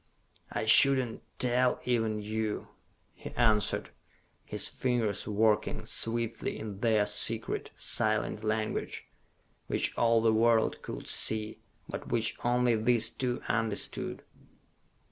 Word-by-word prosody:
"I - - -2
should 135 +5 +7
not 120 -3 -3 0.2
tell 125 0 +1
even 115 -3 -1
you," 110 0 -3 0.4
he - - -9
answered, 110 -4 +1 0.5
his - - -1
fingers 120 -6 -1
working 105 0 0
swiftly 115 0 -1
in 105 -3 -7
their 110 -2 +2
secret, 110 +2 +1
silent 110 0 -1
language, 110 0 -3 0.6
which - - -1
all 115 -1 +3
the 110 0 +2
world 115 0 +2
could - - -8
see, 110 0 +3 0.3
but - - -7
which 115 -2 0
only 120 0 +2
these 115 0 +3
two 125 -1 -3
understood. 115 -3 -1
110 Hz, 115 wpm, -29 LUFS, 110-120 Hz, 0.6 s, should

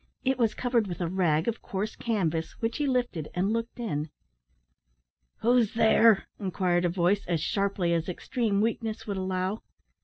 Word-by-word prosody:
It 260 0 +1
was 225 -3 +2
covered 240 -4 +1
with 175 - -5
a 175 - -1
rag 165 -2 +1
of 230 -1 -1
coarse 200 +3 -3
canvas, 170 -8 -1
which 225 0 -1
he 295 -1 0
lifted, 245 - -1
and 190 +4 +1
looked 230 +1 -3
in. 155 -10 -2 1.3
"Who's 235 -2 +3
there?" 225 -2 +5
inquired 180 -2 0
a - - +2
voice, 180 +3 +1
as 170 -2 +1
sharply 195 -2 0
as 165 +1 -1
extreme 205 +2 -1
weakness 225 0 -2
would 200 -2 -3
allow. 185 +2 -2
200 Hz, 160 wpm, -28 LUFS, 175-230 Hz, 1.3 s, there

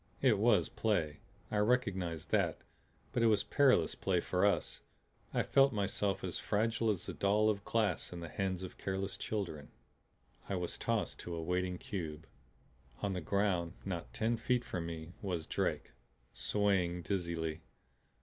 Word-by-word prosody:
It 120 -7 +5
was 105 -6 +4
play; 85 -9 0 0.3
I 105 - 0
recognized 100 -8 +1
that. - - +2 0.6
But 120 - +1
it 115 - +5
was 105 -3 +4
perilous 130 - +4
play - - +1
for - - +2
us. - - 0 0.5
I - - +1
felt 135 -1 +5
myself 100 -1 0
as - - -2
fragile 115 +2 +1
as 95 -4 -1
a - - -3
doll 105 +2 +3
of 100 -1 -4
glass 105 -9 0
in 90 - -6
the 85 - -5
hands 95 +1 -2
of 95 - -8
careless 95 0 -2
children. 85 -9 -4 0.8
I 100 - 0
was 90 -1 -3
tossed - - -1
to 85 - -5
a 80 - -3
waiting 90 +1 0
cube. 80 -5 -5 0.8
On 100 -1 +1
the 90 - -2
ground, 90 -2 +1
not 90 -4 -4
ten 115 +2 0
feet 125 +1 +1
from 85 -3 -3
me, 80 0 -6
was 90 -5 -2
Drake, - - -1 0.4
swaying 90 -4 +1
dizzily. 85 -2 -2
95 Hz, 160 wpm, -34 LUFS, 85-105 Hz, 0.8 s, It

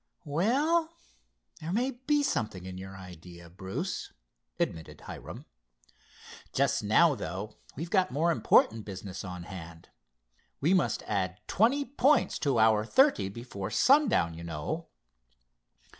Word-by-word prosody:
"Well, 290 - +1 0.6
there 160 +2 -5
may 245 +7 +1
be 285 +4 0
something 105 - -2
in 95 0 -7
your 95 0 -9
idea, 85 -2 -12
Bruce," 95 +1 -5 0.5
admitted 80 -1 -3
Hiram. - - -9 1.1
"Just 140 -2 +2
now, 145 +10 +5
though, 100 - -6 0.2
we've 165 +5 -6
got 185 -2 +3
more 160 +5 +1
important 110 -4 +3
business 95 -1 -7
on 90 -2 -7
hand. 85 -3 -10 0.7
We 160 +7 +2
must 145 - +1
add 95 -3 -2
twenty 260 +8 +2
points 280 +2 +2
to 140 -5 +1
our 110 -1 +4
thirty 260 - +3
before 100 -3 -6
sundown, 255 - +3
you 85 +1 -9
know." 75 -3 -4
110 Hz, 125 wpm, -29 LUFS, -, 1.1 s, now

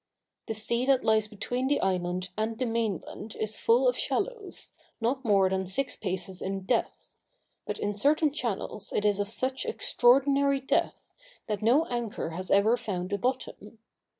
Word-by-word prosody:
The 225 - -2
sea 235 +4 +1
that 270 -2 +3
lies 220 -1 +3
between 245 +4 -3
the 285 - +2
island 185 0 -1
and 220 +1 -2
the 255 - -1
mainland 225 -2 -3
is 215 0 -3
full 245 +3 +4
of 250 - +3
shallows, 445 - -1 0.3
not 255 +4 -1
more 200 -5 +4
than 190 0 -1
six 260 +8 0
paces 185 -1 -3
in 195 0 -3
depth; 225 +5 -2 0.5
but - - -3
in 205 - -2
certain 290 +7 +2
channels 215 -6 -3
it 210 - -1
is 205 -1 +3
of 205 - 0
such 260 +5 -1
extraordinary 275 +2 +3
depth, 270 - -1 0.3
that 210 -1 -3
no 255 +9 +4
anchor 235 - -3
has 185 +3 -4
ever 205 +4 +4
found 185 -3 -4
a 200 - 0
bottom. 245 -3 -3
220 Hz, 165 wpm, -28 LUFS, 200-255 Hz, 0.5 s, full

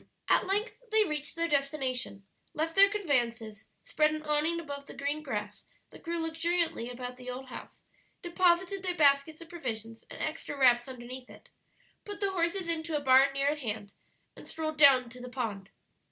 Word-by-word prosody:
At - - +3
length 410 +6 -1
they 435 0 +4
reached 300 -5 -4
their 335 0 0
destination, 270 -8 -1 0.3
left 320 +2 -1
their 395 0 +8
conveyances, 240 - -1 0.2
spread 310 -12 +2
an 310 0 -4
awning 305 +3 +1
above 285 -3 -7
the - - -10
green 285 +2 -2
grass - - -5 0.3
that - - -13
grew 340 +1 -3
luxuriantly 325 -4 -1
about 250 0 -6
the 250 0 -8
old 255 +1 -7
house, - - -10 0.4
deposited 360 +2 +2
their 365 -1 -2
baskets 290 +1 +3
of 335 - -11
provisions 230 -9 -6
and - - -10
extra 310 -2 -4
wraps 245 -2 +4
underneath 255 0 -8
it, - - -16 0.5
put 410 -1 -7
the 395 -1 0
horses 350 0 -1
into 325 -1 -1
a - - -1
barn 270 0 +5
near 275 +1 +1
at 300 0 -2
hand, 215 -5 -4 0.4
and - - -12
strolled 310 -1 -4
down 265 -4 +7
to 250 0 -10
the 250 - -7
pond. 215 -6 -4
295 Hz, 180 wpm, -30 LUFS, 250-335 Hz, 0.5 s, their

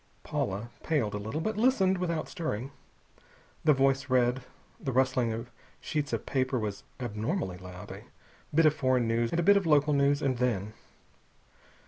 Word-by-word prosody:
Paula 105 +5 -3
paled 140 -10 0
a 105 - -2
little, 110 +10 -4
but 215 +5 -2
listened 200 -6 +3
without 170 -3 -1
stirring. 135 -6 -4 0.9
The 155 - +6
voice 135 0 +2
read 125 0 +2 0.4
the 145 -10 -3
rustling 130 -2 +2
of 115 +2 -5 0.3
sheets 150 -2 -2
of - - -2
paper 130 -1 0
was 105 -3 -3 0.2
abnormally 110 - -2
loud 90 0 -9
a - - -9 0.5
bit 160 +2 +4
of 155 - +6
foreign 130 -5 +1
news, 115 +1 +1
and 165 - -1
a - - +2
bit 200 +3 +6
of 195 -4 0
local 150 -1 +4
news, 140 +1 +2
and 130 -3 0
then.... 110 -5 0
130 Hz, 165 wpm, -29 LUFS, 115-155 Hz, 0.9 s, The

